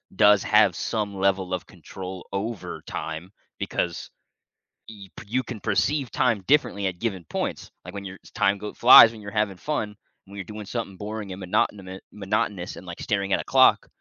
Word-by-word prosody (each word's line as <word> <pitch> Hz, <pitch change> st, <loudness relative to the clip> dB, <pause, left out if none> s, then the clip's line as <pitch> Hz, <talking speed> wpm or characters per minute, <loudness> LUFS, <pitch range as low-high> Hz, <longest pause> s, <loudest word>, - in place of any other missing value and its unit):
does 105 Hz, -1 st, +5 dB
have 105 Hz, -5 st, +4 dB
some 105 Hz, -1 st, -3 dB
level 95 Hz, -1 st, +1 dB
of 90 Hz, -, -3 dB
control 95 Hz, -1 st, -9 dB
over 100 Hz, +1 st, -4 dB
time 80 Hz, +4 st, -6 dB, 0.3 s
because 85 Hz, -1 st, -3 dB, 0.8 s
y 100 Hz, -3 st, -11 dB, 0.2 s
you 120 Hz, +5 st, 0 dB
can 120 Hz, -4 st, -7 dB
perceive 140 Hz, +2 st, 0 dB
time 115 Hz, -5 st, +1 dB
differently 135 Hz, -8 st, +2 dB
at 90 Hz, -2 st, -5 dB
given 95 Hz, -6 st, -3 dB
points. -, -, -4 dB
Like -, -, -10 dB
when 100 Hz, -, -6 dB
you're 95 Hz, 0 st, -8 dB, 0.2 s
time 100 Hz, +1 st, +2 dB
go 105 Hz, -, -6 dB
flies 120 Hz, -2 st, +9 dB
when 115 Hz, -, -11 dB
you're 100 Hz, -1 st, -8 dB
having 105 Hz, -3 st, -1 dB
fun, 105 Hz, -8 st, -3 dB, 0.3 s
when 100 Hz, -, -13 dB
you're 100 Hz, -, -4 dB
doing 105 Hz, +1 st, -8 dB
something 110 Hz, -4 st, -4 dB
boring 105 Hz, -1 st, -6 dB
and 95 Hz, -, -9 dB
monotonous 95 Hz, +1 st, -1 dB
monotonous 100 Hz, -2 st, -2 dB
and, 95 Hz, -, -11 dB
like, 85 Hz, -1 st, -8 dB
staring 100 Hz, -2 st, -1 dB
at -, -, +2 dB
a -, -, -9 dB
clock, -, -, +4 dB
100 Hz, 180 wpm, -25 LUFS, 95-110 Hz, 0.8 s, flies